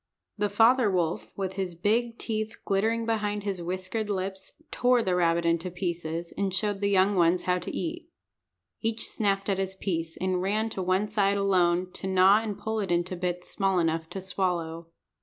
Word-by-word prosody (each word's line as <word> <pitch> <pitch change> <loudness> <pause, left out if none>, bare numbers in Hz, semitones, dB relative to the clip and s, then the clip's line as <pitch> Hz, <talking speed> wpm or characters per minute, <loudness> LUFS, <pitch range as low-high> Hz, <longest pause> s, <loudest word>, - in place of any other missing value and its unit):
The 205 -1 0
father 225 +3 +5
wolf, 175 -3 0
with 190 -1 -2
his 190 -3 -3
big 230 +6 0
teeth 220 0 -3
glittering 225 +3 +1
behind 210 -2 -1
his 195 -3 -3
whiskered 185 +5 -3
lips, 190 -1 -4 0.2
tore 245 -1 +3
the 185 - 0
rabbit 170 -1 +2
into 170 +1 +1
pieces, 170 -2 -4
and 200 -1 -1
showed 205 +1 0
the 200 - +2
young 195 +1 +4
ones 175 0 +3
how 180 0 +1
to - - -6
eat. 335 0 -4 0.7
Each 225 0 -1
snapped 195 -2 0
at 195 -2 0
his 190 0 -2
piece, 165 -4 -3
and 185 -1 0
ran 215 +4 0
to 190 - -3
one 185 +3 +1
side 200 -1 +1
alone 185 -2 +2
to 190 - -6
gnaw 190 +3 +5
and 215 -3 -4
pull 220 0 -2
it 195 -4 -2
into 175 +1 0
bits 180 0 -3
small 195 -1 +1
enough 165 -1 0
to 190 +2 -5
swallow. 170 -3 -2
190 Hz, 185 wpm, -27 LUFS, 180-210 Hz, 0.7 s, father